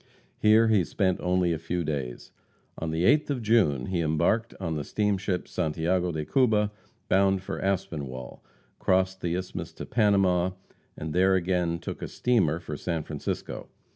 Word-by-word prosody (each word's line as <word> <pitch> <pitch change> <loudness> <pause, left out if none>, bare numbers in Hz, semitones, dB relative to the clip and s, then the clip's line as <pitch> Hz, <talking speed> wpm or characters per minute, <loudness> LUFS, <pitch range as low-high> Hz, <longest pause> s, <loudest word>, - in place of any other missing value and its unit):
Here 110 +1 +5
he 105 -4 +4
spent 95 +1 0
only 90 -1 +2
a 80 - -3
few 85 +2 -2
days. 70 -6 -4 0.5
On 80 - -3
the 80 +2 -1
8th 150 +11 +4
of 130 -5 -2
June 95 - +3
he 90 +1 -1
embarked 85 +9 +1
on 85 -4 -2
the 75 - -2
steamship 100 -2 -1
Santiago 85 +3 0
de 75 -2 -3
Cuba, 105 - +2 0.4
bound 95 0 +3
for - - -4
Aspinwall, 80 -10 -3 0.4
crossed 95 0 +1
the 85 0 -1
Isthmus 90 0 -5
to - - -7
Panama, 95 -5 +2 0.4
and 80 0 -5
there 95 +2 +4
again 90 -2 0
took - - -7
a - - -3
steamer 95 -11 +1
for 75 - -6
San 80 +1 -3
Francisco. - - -5
90 Hz, 160 wpm, -27 LUFS, 80-100 Hz, 0.5 s, Here